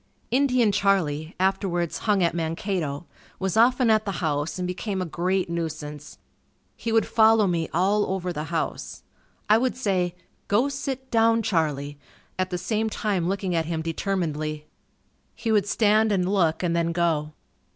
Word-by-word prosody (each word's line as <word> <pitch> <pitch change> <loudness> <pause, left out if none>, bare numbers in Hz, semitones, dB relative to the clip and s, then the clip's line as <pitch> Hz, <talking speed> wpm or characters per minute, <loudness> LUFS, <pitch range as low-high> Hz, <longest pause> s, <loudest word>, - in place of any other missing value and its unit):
Indian 250 -4 +3
Charlie, 170 -6 0
afterwards 185 -3 0
hung 200 -3 +4
at 170 - +2
Mankato, 165 -2 -2 0.3
was 190 +1 -2
often 240 +1 +4
at 215 -1 +3
the 200 - -3
house 150 -2 -2
and 180 -1 -2
became 190 +2 -3
a 185 - -1
great 180 +3 -1
nuisance. 155 -3 -5 0.6
He 230 - -4
would 225 0 +3
follow 220 -1 +4
me 170 -3 -1
all 200 +5 +2
over 185 -2 -2
the 150 -1 -4
house. 165 0 -4 0.4
I 215 +2 +5
would 255 0 -1
say, 185 -7 0 0.3
"Go 240 +7 +2
sit 270 -1 -5
down 225 0 +3
Charlie," 145 -6 -1 0.4
at 185 0 0
the 180 - -2
same 220 +4 -1
time 195 -5 -1
looking 190 -2 -2
at 165 -2 0
him 165 -1 -2
determinedly. 155 -3 -2 0.7
He 225 - -2
would 205 -2 +2
stand 215 +1 +3
and 185 -3 +1
look 185 -4 +1
and 170 -1 +1
then 170 0 0
go. 160 -3 0
185 Hz, 160 wpm, -25 LUFS, 165-215 Hz, 0.7 s, I